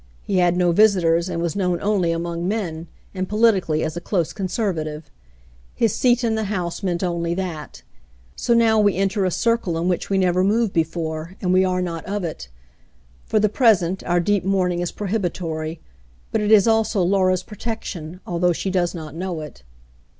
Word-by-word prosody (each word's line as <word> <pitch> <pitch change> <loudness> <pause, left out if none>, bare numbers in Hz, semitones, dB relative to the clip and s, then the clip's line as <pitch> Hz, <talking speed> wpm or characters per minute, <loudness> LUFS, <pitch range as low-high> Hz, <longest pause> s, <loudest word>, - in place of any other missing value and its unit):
He 195 - -1
had 175 -1 +3
no 175 -1 +3
visitors, 175 -3 +3
and 170 -1 -2
was 170 +1 -2
known 180 -3 0
only 195 -5 +1
among 170 +1 -3
men, 175 -6 -3 0.3
and 185 -1 -3
politically 205 -8 +2
as 160 0 -3
a 175 - -4
close 175 -5 -1
conservative. 175 -7 -3 0.6
His 225 -4 +1
seat 245 -1 +2
in 230 -1 +1
the 220 -1 -1
House 180 -3 -3
meant 175 -3 -1
onlv 170 -2 -1
that. 175 -5 -6 0.5
So 235 - +1
now 225 -2 +4
we 205 -2 +3
enter 195 +1 0
a - - +2
circle 225 -3 0
in 170 +2 -1
which 180 -1 -1
we 195 - +1
never 185 -1 +2
moved 215 +1 +1
before, 160 +1 -2
and 180 -1 0
we 185 +1 +5
are 180 -1 0
not 165 -2 -4
rf 200 0 -2
it. 65 - -5 0.8
For 215 - +1
the 215 - +3
present, 195 -6 +2
our 175 0 +2
deep 200 +2 +1
mourning 185 -2 +1
is 175 -1 -2
prohibitory, 170 -6 -3 0.5
but 220 - 0
it 210 0 0
is 215 -1 +6
also 220 -3 +2
Laura's 185 0 +2
protection, 190 -6 -6
although 175 0 +1
she 190 +3 -3
does 180 -1 0
not 155 -3 -7
know 175 -1 -4
it." 150 - -10
185 Hz, 185 wpm, -22 LUFS, 170-205 Hz, 0.8 s, is